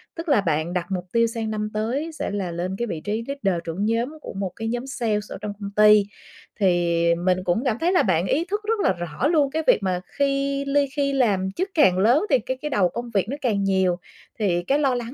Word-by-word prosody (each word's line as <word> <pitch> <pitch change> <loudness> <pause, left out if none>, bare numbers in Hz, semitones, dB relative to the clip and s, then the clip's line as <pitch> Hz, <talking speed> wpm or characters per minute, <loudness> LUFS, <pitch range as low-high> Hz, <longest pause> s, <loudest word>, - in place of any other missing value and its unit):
Tức 330 0 -5
là 250 -8 +4
bạn 160 -1 -1
đặt 180 -2 -1
mục 180 -2 -2
tiêu 230 0 +3
sang 225 -1 -4
năm 215 0 -2
tới 250 +10 -2
sẽ - - -2
là 195 -4 -3
lên 175 +3 -3
cái 240 - -2
vị 165 -7 -4
trí 215 +4 -2
leader, 195 -12 -1
trưởng 170 +5 -3
nhóm 235 +7 -1
của - - -8
một 195 -1 -3
cái 225 - -4
nhóm 245 +3 -3
sale 230 -6 -1
ở - - -6
trong 210 - -4
công 200 -1 -6
ty, 210 0 +7 0.6
thì 175 -3 +2
mình 180 +1 0
cũng 180 +8 0
cảm 240 -3 +1
thấy 345 +2 +2
là 365 - +4
bạn 175 -3 +1
ý 325 +5 +1
thức 415 +3 -2
rất 440 +1 0
là - - +3
rõ 175 - -2
luôn 300 -4 +3
cái 320 +2 -1
việc 210 - +4
mà 180 -2 -1 0.2
khi 275 0 0
ly 280 0 +2
khi 280 -1 0
làm 200 -8 +1
chức 370 - -3
càng 275 - +4
lớn 240 - +4
thì - - +4
cái 255 +3 -4
cái 300 - -3
đầu 200 -10 +2
công 235 +6 -6
việc 195 0 +1
nó 280 - -3
càng 210 -6 0
nhiều. 190 -2 +2 0.4
Thì 175 -5 +1
cái 275 +10 +1
lo 270 -4 +2
lắng 240 0 -5
215 Hz, 250 wpm, -23 LUFS, 185-275 Hz, 0.6 s, ty